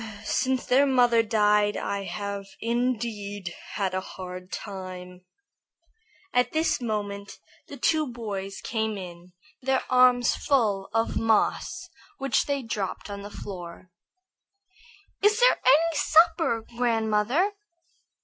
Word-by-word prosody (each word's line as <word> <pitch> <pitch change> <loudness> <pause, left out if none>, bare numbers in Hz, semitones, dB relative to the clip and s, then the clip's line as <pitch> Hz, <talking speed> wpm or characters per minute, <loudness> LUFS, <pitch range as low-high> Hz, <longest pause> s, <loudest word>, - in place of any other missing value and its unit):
Since 260 +4 0
their 275 +3 +4
mother 245 -3 +4
died 210 -2 +2
I 200 -1 -3
have 200 -1 -5
indeed 220 -5 -2 0.2
had 195 -2 -1
a 185 - -1
hard 185 0 -9
time." 185 -2 -7 1.1
At 250 0 +2
this 315 -3 +1
moment 205 -3 -4 0.3
the 285 - -9
two 310 +4 +2
boys 200 -4 -5
came 220 -2 -2
in, 175 -1 -10 0.3
their 265 0 +1
arms 250 -1 +5
full 215 -9 +1
of 225 +1 0
moss 225 - +1 0.3
which 275 0 +1
they 280 -2 -1
dropped 205 -2 -4
on 200 0 -6
the 205 - -8
floor. 180 -3 -9 1.3
"Is 420 +2 +4
there - - +5
any 315 +5 +4
supper, 320 -7 +3
grandmother?" 235 - +1
220 Hz, 115 wpm, -26 LUFS, 200-255 Hz, 1.3 s, arms